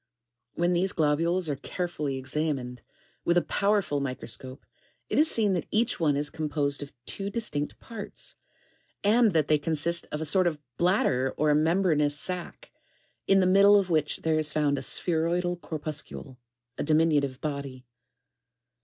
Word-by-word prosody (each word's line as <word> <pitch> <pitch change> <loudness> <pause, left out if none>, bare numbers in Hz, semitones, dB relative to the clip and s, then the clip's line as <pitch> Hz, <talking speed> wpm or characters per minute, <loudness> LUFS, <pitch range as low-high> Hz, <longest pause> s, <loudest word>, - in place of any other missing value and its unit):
[ 120 0 -58
When 175 +1 +1
these 180 +2 +1
globules 165 +4 +1
are 145 - -1
carefully 150 -3 -4
examined, 130 -2 -3 0.4
with 170 - +2
a 175 - +3
powerful 200 -7 +1
microscope, 130 -1 -4 0.4
it - - +1
is 315 +1 +5
seen 210 -4 +2
that 175 - -2
each 230 0 0
one 150 -4 +2
is 145 +1 -1
composed 145 -2 -1
of 145 - -7
two 195 0 -4
distinct 200 -10 -3
parts, 230 - -5 0.7
and 220 0 +4
that 155 -3 +2
they 155 -1 +3
consist 165 +3 0
of 150 - -3
a 160 - -2
sort 185 +4 +3
of 160 -3 -1 0.2
bladder 135 -8 +1
or 150 0 +3
membranous 155 -2 +2
sack, 180 - -5 0.6
in 195 0 +5
the - - +3
middle 200 +2 +6
of 185 -3 -3
which 155 -2 0
there 160 -1 +2
is 155 -1 0
found 145 -2 +1
a - - -6
spheroidal 175 +5 0
corpus 155 -3 -4
cule, 130 -3 -11 0.2
— 125 0 -49
(a - - 0
diminutive 150 -4 +2
body.) 140 -4 -5
155 Hz, 160 wpm, -27 LUFS, 145-180 Hz, 0.7 s, middle